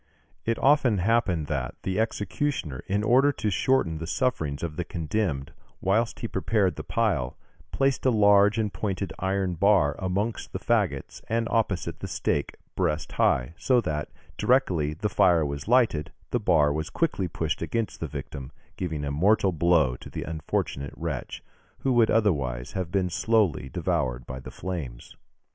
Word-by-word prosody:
It 115 0 0
often 135 -6 +4
happened 95 -5 +1
that 70 -4 -3
the 95 +2 -1
executioner, 110 - -2
in 100 +2 0
order 130 +6 +5
to 105 - -2
shorten 85 -6 +1
the 80 - -5
sufferings 80 - -1
of 80 -3 -3
the 90 - -2
condemned, 80 -4 -2 0.3
whilst 110 +5 0
he 115 - -2
prepared 95 -3 +1
the - - -6
pile, 65 -1 0 0.3
placed 135 -1 +1
a - - +6
large 105 -2 +5
and 105 -3 -1
pointed 95 -3 -3
iron 95 -1 0
bar 90 -5 +3
amongst 100 +5 -2
the - - -3
faggots - - -1
and 115 0 0
opposite 105 -5 0
the - - -5
stake 70 - -1 0.2
breast 75 +2 -1
high, 60 +5 +1
so 130 -2 +3
that, 80 -8 -2 0.3
directly 85 - +2
the 105 +6 -1
fire 85 -6 +4
was 70 +2 -5
lighted, 110 - +3 0.2
the 120 - +1
bar 80 -8 +3
was 80 +2 -3
quickly 145 - 0
pushed 80 -2 -3
against 110 +6 -2
the - - -3
victim, 65 -1 -7 0.3
giving 80 -5 -3
a 70 - -2
mortal 95 +6 +3
blow 80 -6 +3
to - - -11
the - - -5
unfortunate 75 -3 -3
wretch, - - -5 0.4
who 135 - +1
would 115 -2 +4
otherwise 70 - +1
have 95 -3 -3
been 95 -2 0
slowly 100 - +1
devoured 60 -1 -1
by 65 0 -6
the 65 - -9
flames. 75 -11 -6
90 Hz, 160 wpm, -26 LUFS, 75-110 Hz, 0.4 s, a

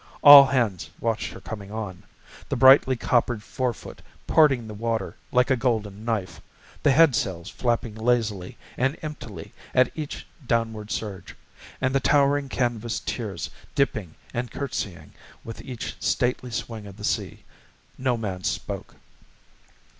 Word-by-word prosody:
All 145 -2 +11
hands 115 -9 0
watched 115 -2 -1
her - - -10
coming 100 -2 -8
on 105 -5 -5 0.5
the - - 0
brightly 130 0 +7
coppered 120 -2 +1
forefoot 125 -1 -4 0.2
parting 135 -7 +4
the 110 - -7
water 115 -1 -2 0.2
like 125 +2 +3
a - - +5
golden 110 -5 -1
knife, 110 -5 -3 0.4
the - - +3
headsails 125 - +3
flapping 120 -2 -1
lazily 110 -5 -1 0.2
and 135 +4 +1
emptily 150 -1 -8 0.2
at 130 0 +4
each 155 -2 -6 0.2
downward 115 -2 -1
surge, 100 -5 -5 0.4
and 130 0 0
the 135 - +3
towering 140 0 +2
canvas 120 -3 -1
tiers 105 -7 -4 0.2
dipping 105 - 0 0.2
and 120 0 -2
curtsying 105 - -5 0.3
with 115 - -8
each 125 -3 -6
stately 125 -1 0
swing 110 -2 -5
of 100 0 -12
the 105 - -10
sea. - - -2 0.5
No 130 -2 0
man 95 -5 -4
spoke. - - -4
115 Hz, 135 wpm, -25 LUFS, 105-130 Hz, 0.5 s, All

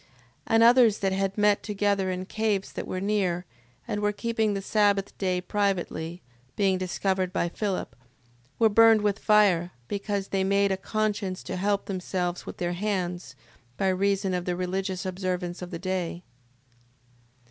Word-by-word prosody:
6:11. - - -30 0.4
And 225 0 +4
others 235 -3 +6
that 195 -1 0
had 195 +1 -1
met 205 -1 +3
together 200 -2 0
in 185 0 -3
caves 210 -1 -1
that - - -5
were 185 - -3
near, 190 -3 0 0.4
and 205 - -2
were 210 0 +2
keeping 220 -1 -1
the 195 - -2
sabbath 205 -1 +1
day 185 -2 0
privately, 180 -3 -2 0.3
being 195 -2 +2
discovered 185 0 -1
by 180 - 0
Philip, 195 +1 -3 0.6
were 225 - +5
burnt 225 0 +6
with 205 0 +1
fire, 195 -5 +3
because 200 +1 -3
they 195 -1 0
made 200 +1 +2
a - - +2
conscience 205 -1 -2
to 185 - -5
help 200 +2 0
themselves 180 -2 -3
with - - -7
their 175 0 -1
hands, 180 -6 -3 0.4
by 190 - +1
reason 195 0 +1
of 180 -1 -2
the 180 - -1
religious 185 +1 -2
observance 185 -1 -3
of 180 - -6
the 170 - -5
day. 180 -1 -3
195 Hz, 160 wpm, -27 LUFS, 185-205 Hz, 0.6 s, others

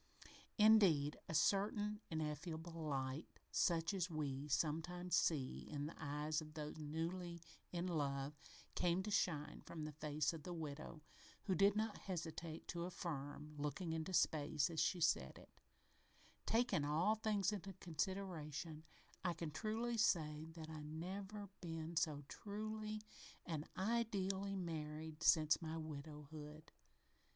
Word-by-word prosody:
Indeed, 195 -10 +6
a 160 - -1
certain 205 +5 +3
ineffable 160 +2 -3
light 145 -2 -2 0.2
such 165 +2 +3
as 185 -2 0
we 145 -3 -2
sometimes 165 +4 +1
see 140 -6 +2
in 145 -1 -2
the 155 - -5
eyes 150 +2 0
of 155 0 -10
those 150 0 -4
newly 170 +3 -2 0.3
in 175 0 -1
love 140 -4 0 0.4
came 180 +1 +2
to 210 - -3
shine 155 -7 +1
from 155 -2 -5
the 155 - -4
face 150 +1 0
of 160 - -6
the 175 +3 -5
widow, 155 0 -5 0.4
who 195 - +1
did 200 +3 +6
not 215 0 0
hesitate 165 -3 -4
to 170 0 -1
affirm, 150 -4 -4
looking 150 +4 -1
into 160 +3 -2
space 155 -2 +3
as 160 - -2
she 180 - +3
said 165 0 +3
it: - - -16 0.9
"Takin' 225 -9 +3
all 155 +8 +3
things 215 -2 +2
into 195 -1 -4
consideration, 165 -3 -3 0.4
I 175 -1 +2
can 165 -1 -3
truly 225 +8 -1
say 155 -5 +3
that 160 -2 -6
I 160 -1 -6
have 150 - -6
never 190 +6 -4
been 165 -1 -4
so 155 -3 +1
truly 215 +3 -4 0.4
and 160 -3 -3
ideely 200 -2 +1
married 155 -3 -3
as - - +3
since 155 0 +6
my 160 0 -3
widowhood." 150 0 -7
165 Hz, 140 wpm, -42 LUFS, 150-190 Hz, 0.9 s, Indeed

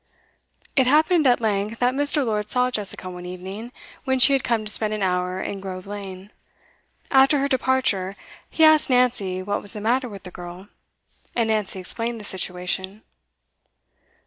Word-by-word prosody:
It 265 -2 +4
happened 310 +2 +4
at 245 - +4
length 215 0 -1
that 245 +1 +2
Mr. 285 +1 +2
Lord 210 -2 -2
saw 250 0 +2
Jessica 205 -4 -3
one 180 -1 -7
evening, 190 +6 -7 0.3
when 265 -2 +1
she 260 +2 +7
had 270 - +2
come 225 -2 0
to 210 - -1
spend 215 0 -1
an 210 - -3
hour 180 0 0
in 200 +1 -4
Grove 185 -1 -7
Lane. 200 -1 -8 0.8
After 270 +2 +5
her 275 0 +1
departure, 260 -8 0 0.3
he 320 - +1
asked 310 -2 +6
Nancy 240 -8 +1
what 205 +2 -2
was 205 - -2
the 215 - -6
matter 245 +4 0
with 200 -3 -10
the 180 - -9
girl, 175 +3 -10 0.7
and 230 -2 +1
Nancy 210 -3 -1
explained 230 +5 -4
the - - -10
situation. 190 +2 -3
215 Hz, 170 wpm, -23 LUFS, 190-255 Hz, 0.8 s, she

